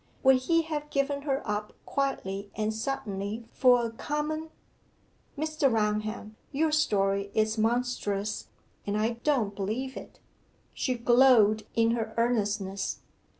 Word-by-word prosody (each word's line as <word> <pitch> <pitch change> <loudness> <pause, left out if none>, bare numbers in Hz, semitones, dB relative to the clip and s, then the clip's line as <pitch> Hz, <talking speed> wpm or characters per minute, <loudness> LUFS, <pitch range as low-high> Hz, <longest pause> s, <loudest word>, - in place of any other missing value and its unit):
Would 265 -1 +7
he 330 +6 +2
have 300 -2 -4
given 280 0 0
her 275 -3 -2
up 210 0 -2
quietly 200 -8 -2
and 215 0 -1
suddenly 220 -3 -3
for 245 -2 +5
a 230 - -3
common 300 +6 -3 0.9
Mr. 310 -2 +1
Raunham, 215 0 -1
your 310 +2 +1
story 200 -9 +1
is 220 0 +1
monstrous, 215 -3 -1 0.4
and 205 +1 0
I 230 +2 0
don't 235 -9 +1
believe 225 +7 -3
it!' - - -10 0.5
She 255 - -1
glowed 235 -3 +5
in 230 0 +3
her 225 -1 -2
earnestness. 210 -4 0
230 Hz, 125 wpm, -28 LUFS, 210-275 Hz, 0.9 s, Would